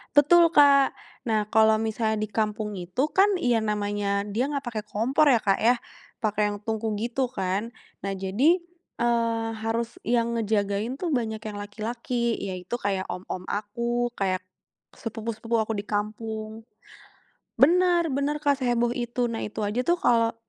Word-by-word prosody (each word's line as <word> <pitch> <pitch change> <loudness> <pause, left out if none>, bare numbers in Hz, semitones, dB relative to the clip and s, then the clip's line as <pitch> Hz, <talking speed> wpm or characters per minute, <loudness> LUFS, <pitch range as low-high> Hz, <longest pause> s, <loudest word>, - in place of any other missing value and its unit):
Betul 335 +4 +6
Kak, 280 -3 +6 0.3
nah 215 -4 0
kalau 220 0 +4
misalnya 220 0 -1
di 215 - -1
kampung 210 0 -2
itu 185 - -1
kan 395 +2 +5
yang 235 -5 +2
namanya 205 -1 -1
dia 215 +5 -1
nggak 285 - 0
pake 220 -3 -3
kompor 230 +8 +1
ya, 240 - +4
Kak 195 -2 +2
ya, 245 +1 +4 0.4
pake 215 -3 -1
yang 205 - -6
tungku 220 +1 -2
gitu 245 +2 -1
kan. 200 +1 -2 0.3
Nah 195 - -2
jadi, 200 - +2 0.4
eee, 230 -1 +1 0.2
harus 230 +1 -2
yang 235 0 +1
ngejagain 215 +3 -1
tuh 335 -6 0
banyak 220 -3 -2
yang 215 -1 -7
laki-laki, 235 +3 -2
yaitu 185 +2 -4
kayak 195 -5 -2
om-om 185 0 -6
aku, 235 +4 -2
kayak 185 -1 0 0.5
sepupu-sepupu 225 0 -4
aku 220 0 -1
di 205 - -6
kampung. 215 +1 -4 1.0
Benar, 345 +2 +4
benar 280 +2 0
Kak, 285 -2 +2
seheboh 240 -2 +1
itu, 240 0 -1
nah 225 - -3
itu 210 - -6
aja 210 +4 0
tuh 345 - +4
kalau 230 -1 +3
225 Hz, 150 wpm, -26 LUFS, 210-245 Hz, 1.0 s, Betul